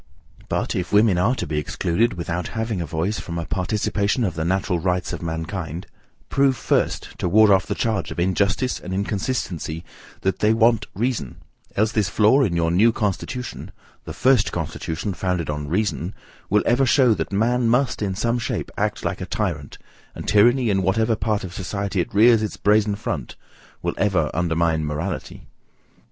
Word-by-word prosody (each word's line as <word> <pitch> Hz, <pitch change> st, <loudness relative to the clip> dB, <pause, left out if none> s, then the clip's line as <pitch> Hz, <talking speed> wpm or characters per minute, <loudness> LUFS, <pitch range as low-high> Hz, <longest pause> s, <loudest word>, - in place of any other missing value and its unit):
But, -, -, -1 dB
if 90 Hz, -2 st, -3 dB
women 105 Hz, -3 st, +4 dB
are 115 Hz, +8 st, +2 dB
to -, -, -3 dB
be 75 Hz, -, -1 dB
excluded, 85 Hz, +9 st, 0 dB
without 85 Hz, 0 st, -3 dB
having 110 Hz, -4 st, -1 dB
a 85 Hz, -, -4 dB
voice, 85 Hz, +8 st, -2 dB
from 85 Hz, -1 st, -6 dB
a 85 Hz, -, -3 dB
participation 100 Hz, +5 st, 0 dB
of 95 Hz, -6 st, 0 dB
the 80 Hz, 0 st, -3 dB
natural 90 Hz, 0 st, 0 dB
rights 90 Hz, +1 st, -1 dB
of -, -, -5 dB
mankind, 80 Hz, 0 st, -4 dB, 0.4 s
prove 135 Hz, -2 st, +2 dB
first, -, -, 0 dB
to 90 Hz, -, 0 dB
ward 110 Hz, +3 st, +6 dB
off 95 Hz, -4 st, +3 dB
the -, -, -2 dB
charge 110 Hz, -3 st, -1 dB
of -, -, -6 dB
injustice 100 Hz, +7 st, +1 dB
and 95 Hz, +1 st, -5 dB
inconsistency, 95 Hz, -, -3 dB, 0.4 s
that 95 Hz, -1 st, -1 dB
they 110 Hz, +1 st, +3 dB
want 115 Hz, -2 st, +3 dB
reason, 115 Hz, -, -2 dB, 0.4 s
else 110 Hz, +2 st, +2 dB
this 105 Hz, -3 st, +1 dB
flaw 110 Hz, +8 st, +4 dB
in 100 Hz, -10 st, +1 dB
your 85 Hz, -1 st, +1 dB
NEW 105 Hz, +7 st, +5 dB
CONSTITUTION, 110 Hz, +3 st, -3 dB, 0.4 s
the -, -, -6 dB
first 130 Hz, -4 st, +3 dB
constitution 80 Hz, +3 st, -3 dB
founded 90 Hz, -3 st, -2 dB
on 75 Hz, 0 st, -4 dB
reason, 95 Hz, +1 st, -1 dB, 0.3 s
will 105 Hz, +1 st, +3 dB
ever 130 Hz, +3 st, +3 dB
show 125 Hz, -3 st, +5 dB
that 80 Hz, -3 st, -3 dB
man 115 Hz, +4 st, +2 dB
must, 125 Hz, +1 st, +1 dB
in 95 Hz, -3 st, -1 dB
some 115 Hz, +4 st, 0 dB
shape, 120 Hz, -, -3 dB
act -, -, -1 dB
like -, -, -2 dB
a -, -, -4 dB
tyrant, -, -, -3 dB, 0.4 s
and -, -, -7 dB
tyranny, 120 Hz, +3 st, +4 dB
in 95 Hz, -1 st, +1 dB
whatever 110 Hz, +5 st, +2 dB
part 105 Hz, -1 st, -1 dB
of 90 Hz, -1 st, -7 dB
society 100 Hz, 0 st, -2 dB
it 115 Hz, -, -5 dB
rears 110 Hz, +2 st, +5 dB
its 110 Hz, -, -3 dB
brazen 105 Hz, 0 st, +3 dB
front, 85 Hz, -, -4 dB, 0.5 s
will -, -, 0 dB
ever 95 Hz, -7 st, +1 dB
undermine 80 Hz, -2 st, +1 dB
morality. 75 Hz, +5 st, -4 dB
100 Hz, 175 wpm, -22 LUFS, 85-110 Hz, 0.5 s, ward